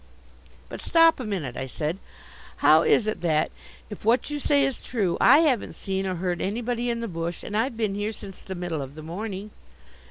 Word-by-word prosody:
"But - - -8
stop 330 -2 +5
a - - -3
minute," 180 - -3
I 130 - -4
said. 155 +7 -3 0.7
"How - - +8
is 440 - +3
it 215 - -2
that, 155 -2 +1 0.4
if 210 - -8
what 235 +6 +2
you 295 - -2
say 285 -1 +3
is 270 -2 -3
true, 200 -8 -1
I 285 +6 +7
haven't 275 -9 +1
seen 190 0 -2
or 185 - -1
heard 175 0 -2
anybody 240 +4 -1
in 235 -1 -2
the 230 - -3
bush, 165 -2 -4
and 205 - -5
I've 230 +2 0
been 215 -3 0
here 205 +2 -2
since 200 -3 -10
the 190 - -7
middle 175 -4 -3
of 135 +1 -8
the 155 - -9
morning?" 200 +4 -5
205 Hz, 210 wpm, -25 LUFS, 175-240 Hz, 0.7 s, How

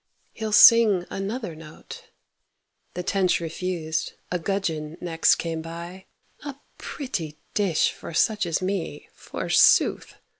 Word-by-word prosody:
he'll 220 -1 -5
sing 210 -4 +7
another 200 0 -4
note. 155 -1 -12 0.9
The 180 - -4
tench 195 -1 +1
refused, 165 -1 -4 0.2
a 180 - -1
gudgeon 165 -4 -3
next 165 -2 +2
came 165 -1 -4
by: 170 +3 -9 0.4
"A 285 -2 -6 0.2
pretty 170 - -5 0.2
dish 190 -7 +1
for - - -10
such 210 +3 +1
as 165 +2 -1
me, 185 -6 -4
forsooth! - - +2
180 Hz, 115 wpm, -24 LUFS, 165-200 Hz, 0.9 s, sing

